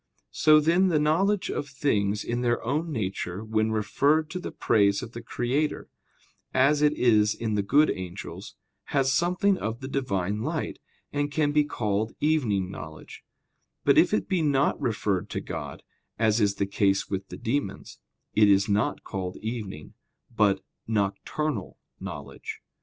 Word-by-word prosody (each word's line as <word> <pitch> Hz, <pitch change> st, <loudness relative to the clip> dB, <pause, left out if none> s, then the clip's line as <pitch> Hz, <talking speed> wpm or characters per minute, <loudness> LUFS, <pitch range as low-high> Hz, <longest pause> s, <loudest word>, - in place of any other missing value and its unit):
So 155 Hz, 0 st, +5 dB
then 170 Hz, +5 st, +3 dB
the 170 Hz, -4 st, +2 dB
knowledge 185 Hz, +7 st, +2 dB
of 145 Hz, -, -3 dB
things 105 Hz, -7 st, 0 dB
in 120 Hz, +1 st, -2 dB
their 120 Hz, -1 st, +1 dB
own 155 Hz, +6 st, -1 dB
nature, 100 Hz, -5 st, -3 dB
when 110 Hz, 0 st, 0 dB
referred 140 Hz, +9 st, +1 dB
to 180 Hz, -, -3 dB
the -, -, -6 dB
praise 100 Hz, 0 st, +2 dB
of 115 Hz, -, -8 dB
the 120 Hz, -, -7 dB
Creator, 125 Hz, +6 st, -2 dB, 0.7 s
as 140 Hz, +3 st, +4 dB
it 150 Hz, 0 st, +4 dB
is 110 Hz, -6 st, +3 dB
in 110 Hz, -2 st, -2 dB
the 105 Hz, -, +2 dB
good 140 Hz, +10 st, +4 dB
angels, 90 Hz, -2 st, -7 dB, 0.3 s
has 135 Hz, -1 st, +1 dB
something 180 Hz, +5 st, +2 dB
of 110 Hz, +1 st, -3 dB
the 130 Hz, -, -6 dB
Divine 105 Hz, -7 st, -1 dB
light, -, -, -3 dB, 0.3 s
and 145 Hz, 0 st, -1 dB
can 145 Hz, 0 st, +1 dB
be 150 Hz, 0 st, +4 dB
called 110 Hz, -6 st, -2 dB
evening 115 Hz, -12 st, +1 dB
knowledge; 80 Hz, -2 st, -10 dB, 0.6 s
but -, -, +4 dB
if -, -, +4 dB
it 100 Hz, -, 0 dB
be 185 Hz, -3 st, +1 dB
not 140 Hz, -2 st, +2 dB
referred 105 Hz, -4 st, -1 dB
to -, -, -3 dB
God, -, -, -6 dB, 0.3 s
as 110 Hz, 0 st, +2 dB
is 100 Hz, -1 st, +2 dB
the 100 Hz, -, 0 dB
case 100 Hz, 0 st, +1 dB
with 95 Hz, 0 st, -4 dB
the -, -, -8 dB
demons, 140 Hz, +5 st, -3 dB, 0.3 s
it 105 Hz, -1 st, +5 dB
is 100 Hz, 0 st, +4 dB
not 105 Hz, +1 st, 0 dB
called 95 Hz, -2 st, -5 dB
evening, 105 Hz, -9 st, -6 dB, 0.4 s
but 100 Hz, -3 st, +3 dB, 0.3 s
"nocturnal" 110 Hz, +8 st, -2 dB, 0.2 s
knowledge. 450 Hz, -1 st, -7 dB
115 Hz, 160 wpm, -26 LUFS, 100-150 Hz, 0.7 s, So